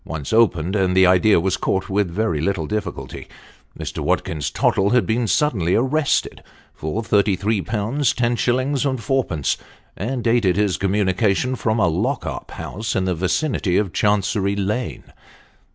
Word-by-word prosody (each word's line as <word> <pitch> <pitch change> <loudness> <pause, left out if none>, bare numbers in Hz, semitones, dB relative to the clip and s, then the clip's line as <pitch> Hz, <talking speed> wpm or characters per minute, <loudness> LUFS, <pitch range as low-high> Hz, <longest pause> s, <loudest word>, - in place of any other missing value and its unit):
Once 80 0 -5
opened 95 -5 +2
and 95 -2 +1
the 95 - +7
idea 90 +2 +4
was 95 +2 0
caught 95 0 -1
with 100 -1 0
very 85 -4 -1
little 90 -2 -1
difficulty. 105 +1 -5 0.5
Mr. - - -5
Watkins 75 -3 -1
Tottle 100 +1 +1
had 120 -4 +3
been 115 +4 0
suddenly 105 - +1
arrested 135 +5 0 0.3
for 80 +9 -4
33Z. 105 -1 +1
10s. 125 +3 0
4d., 105 - -1 0.4
and 120 +4 -3
dated 115 -6 +2
his 105 -2 0
communica 100 0 +1
tion 125 +4 -1
from 110 -2 -1
a 95 - +4
lock 110 - -1
up - - -6
house 110 +3 -5
in 95 - +1
the 95 - 0
vicinity 95 - 0
of 100 -4 -1
Chancery 100 -1 +1
Lane. 105 +5 -3
105 Hz, 145 wpm, -21 LUFS, 95-120 Hz, 0.5 s, the